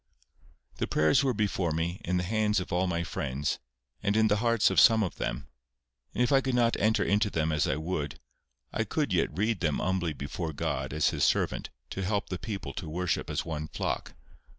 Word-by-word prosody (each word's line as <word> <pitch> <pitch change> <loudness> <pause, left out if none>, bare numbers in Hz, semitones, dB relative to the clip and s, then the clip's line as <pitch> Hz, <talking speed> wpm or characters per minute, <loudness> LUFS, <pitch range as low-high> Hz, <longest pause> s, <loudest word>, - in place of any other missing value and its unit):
The - - -1
prayers 75 - +3
were 135 - +2
before 100 -4 0
me, 85 +4 -2
in 90 +1 0
the 90 - 0
hands 105 +2 +1
of 90 0 -5
all 90 +1 +2
my 85 -1 -1
friends, 70 -2 -2 0.4
and 105 +1 +1
in 110 -1 +4
the 105 - +3
hearts 115 -1 +3
of - - +4
some 110 -1 +7
of 95 - -4
them; 65 +4 -3 0.7
and 125 - +3
if 125 - +1
I 135 -1 +5
could 130 -1 -1
not 120 -1 +3
enter 110 +1 +2
into 105 +1 +2
them 80 -3 0
as 75 0 +1
I - - +1
would, 80 -2 -3 0.5
I - - +1
could - - -1
yet - - 0
read 110 0 +1
them 75 -4 +1
humbly 90 -3 0
before 80 +3 -4
God 70 - -2
as 80 +1 +2
His - - -1
servant - - +1 0.2
to 95 - -3
help 100 +2 -1
the 90 - -3
people 105 -4 -5
to 80 - -7
worship 90 +3 -1
as - - -2
one 80 -2 -4
flock. - - -3
90 Hz, 210 wpm, -29 LUFS, 80-105 Hz, 0.7 s, some